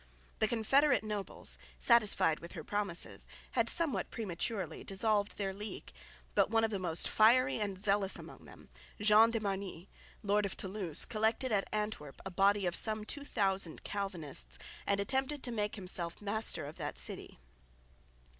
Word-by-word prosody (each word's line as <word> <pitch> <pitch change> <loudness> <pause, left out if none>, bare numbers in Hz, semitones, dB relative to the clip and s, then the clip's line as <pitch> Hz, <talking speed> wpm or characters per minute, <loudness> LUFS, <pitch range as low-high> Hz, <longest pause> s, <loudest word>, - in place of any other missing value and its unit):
The 220 - +3
confederate 270 +7 +3
nobles, 210 -2 -4 0.2
satisfied 210 -9 +4
with 170 - -10
her 165 -5 -7
promises, 200 -3 -2 0.2
had - - +1
somewhat 335 -5 +3
prematurely 190 -4 -3
dissolved 205 +1 0
their 195 -2 -2
league; 210 +2 -7 0.4
but - - +3
one 225 0 +2
of 225 - +1
the 200 - -2
most 170 -3 0
fiery 250 +4 +4
and 200 -3 -2
zealous 200 -1 +2
among - - -10
them, - - -15 0.3
John 215 +2 +6
de 230 -1 -1
Marnix, 195 -3 -4 0.3
lord 205 0 +2
of 190 - -5
Thoulouse, 190 -5 +2
collected 225 +3 0
at 200 -2 +1
Antwerp 210 -10 -3
a 190 - -4
body 195 +2 +3
of 175 -1 0
some 215 -1 +1
2000 195 - -1
Calvinists 155 - -4 0.3
and 200 0 +2
attempted 265 +7 -1
to 245 - -1
make 210 -2 -2
himself 180 -4 -3
master 210 -5 0
of 150 +3 -9
that - - -4
city. - - -2
205 Hz, 155 wpm, -33 LUFS, 190-220 Hz, 0.4 s, John